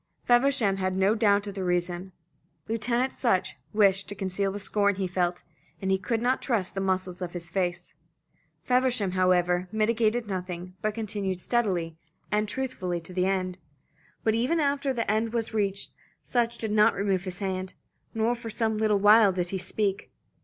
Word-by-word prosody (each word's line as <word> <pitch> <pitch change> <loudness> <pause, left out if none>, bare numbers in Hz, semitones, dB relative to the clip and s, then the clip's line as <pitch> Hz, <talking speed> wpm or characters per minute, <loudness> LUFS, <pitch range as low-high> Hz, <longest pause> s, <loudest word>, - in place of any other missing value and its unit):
Feversham 240 -5 +3
had 185 -1 -1
no 195 +2 +3
doubt 205 -2 +3
of 200 - -5
the 190 -1 -4
reason. 180 +1 -1 0.6
Lieutenant 240 +3 0
Sutch 185 - 0 0.2
wished 195 -1 +3
to 205 - -4
conceal 195 0 -1
the 205 - -5
scorn 205 0 +1
he 190 0 -2
felt, 180 -1 -1 0.4
and 190 0 +1
could 230 +1 -1
not 255 +2 +1
trust 215 -8 0
the 195 - -2
muscles 185 -1 -1
of 175 -1 -4
his 170 -2 -6
face. 175 -2 -2 0.7
Feversham, 250 -6 +1
however, 180 -1 +2
mitigated 220 +1 +1
nothing, 180 -2 -5
but 215 0 -1
continued 205 -4 -3
steadily 180 -8 -1 0.3
and 210 0 +1
truthfully 205 -10 -3
to 170 +2 -9
the 180 0 +1
end. 185 -1 -1 0.6
But 220 - +2
even 250 +9 +1
after 280 -2 +1
the 235 -3 -1
end 220 +1 0
was 230 -1 -1
reached, 200 -2 -1 0.3
Sutch 235 -1 0
did 220 -2 -3
not 210 0 +4
remove 195 -2 0
his 180 -1 -5
hand, 190 -2 -3 0.4
nor 225 +2 +2
for 235 -1 -7
some 220 -1 -1
little 215 -2 +3
while 205 +1 +6
did 180 -1 -2
he 190 - -3
speak. 200 +1 -2
200 Hz, 170 wpm, -27 LUFS, 185-225 Hz, 0.7 s, while